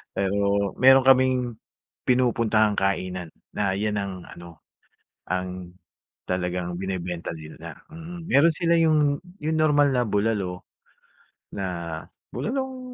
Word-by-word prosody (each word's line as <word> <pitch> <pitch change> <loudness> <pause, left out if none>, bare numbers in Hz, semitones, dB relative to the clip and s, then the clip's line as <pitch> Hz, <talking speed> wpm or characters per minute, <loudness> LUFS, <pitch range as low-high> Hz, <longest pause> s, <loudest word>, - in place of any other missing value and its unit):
pero 100 0 +1
meron 130 +1 +7
kaming, 130 -1 +5 0.6
pinupuntahang 115 -4 +2
kainan 90 -3 -1 0.2
na 100 -2 +1
'yan 105 +2 -1
ang 95 -3 -6
ano, 85 -2 -12 0.7
ang 90 -1 -3 0.6
talagang 90 -1 -2
binebenta 90 -2 -4
nila, 80 0 -10
mm. 165 +1 -9
Meron 145 +5 +5
sila 170 0 +2
yung, 150 -3 +3 0.2
yung 160 +1 0
normal 145 -2 +4
na 125 - +3
bulalo 100 -4 -1 0.8
na 100 - -4 0.7
bulalong 265 +2 -3
100 Hz, 105 wpm, -25 LUFS, 90-140 Hz, 0.8 s, meron